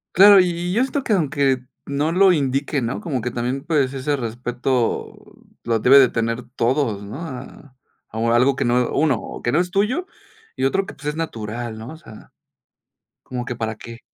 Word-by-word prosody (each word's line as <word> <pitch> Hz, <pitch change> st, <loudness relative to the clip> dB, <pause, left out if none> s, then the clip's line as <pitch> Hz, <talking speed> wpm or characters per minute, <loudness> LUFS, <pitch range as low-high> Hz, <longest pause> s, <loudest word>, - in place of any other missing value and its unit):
Claro, 200 Hz, +2 st, +9 dB
y 180 Hz, -1 st, +4 dB
y, 175 Hz, +1 st, -3 dB
yo 230 Hz, -, +2 dB
esto 270 Hz, +1 st, -1 dB
que 220 Hz, -, 0 dB
aunque 140 Hz, -7 st, +1 dB, 0.3 s
no 145 Hz, +3 st, -1 dB
lo 185 Hz, +1 st, +5 dB
indique, 140 Hz, -1 st, 0 dB
¿no? 115 Hz, +1 st, -2 dB
Como 150 Hz, -, -3 dB
que 125 Hz, -, -2 dB
también, 125 Hz, +3 st, -3 dB
pues, 145 Hz, -5 st, +1 dB
ese 140 Hz, +2 st, -1 dB
respeto 120 Hz, 0 st, -2 dB, 0.5 s
lo 115 Hz, -1 st, 0 dB
debe 135 Hz, +5 st, +7 dB
de 130 Hz, -3 st, +6 dB
tener 115 Hz, +1 st, -2 dB
todos, 115 Hz, -4 st, 0 dB
¿no? 100 Hz, +6 st, -8 dB
A 135 Hz, -2 st, -9 dB, 0.4 s
a 115 Hz, +1 st, +1 dB
algo 130 Hz, +3 st, +4 dB
que -, -, -1 dB
no, 120 Hz, 0 st, +1 dB
1, 145 Hz, -4 st, +2 dB
o -, -, -9 dB
que 120 Hz, -, +1 dB
no 155 Hz, -, +2 dB
es 180 Hz, 0 st, 0 dB
tuyo, 215 Hz, -, 0 dB, 0.5 s
y -, -, -3 dB
otro 195 Hz, +8 st, +1 dB
que, -, -, -9 dB
pues, 150 Hz, -, -14 dB
es 150 Hz, -, -4 dB
natural, 115 Hz, -7 st, -5 dB
¿no? 110 Hz, +2 st, -8 dB
O 160 Hz, -, -9 dB
sea, 110 Hz, -10 st, -14 dB, 0.9 s
¿como 125 Hz, -1 st, -5 dB
que, 125 Hz, -, -4 dB
para 110 Hz, -1 st, -3 dB
qué? 115 Hz, +2 st, -11 dB
135 Hz, 200 wpm, -21 LUFS, 120-160 Hz, 0.9 s, Claro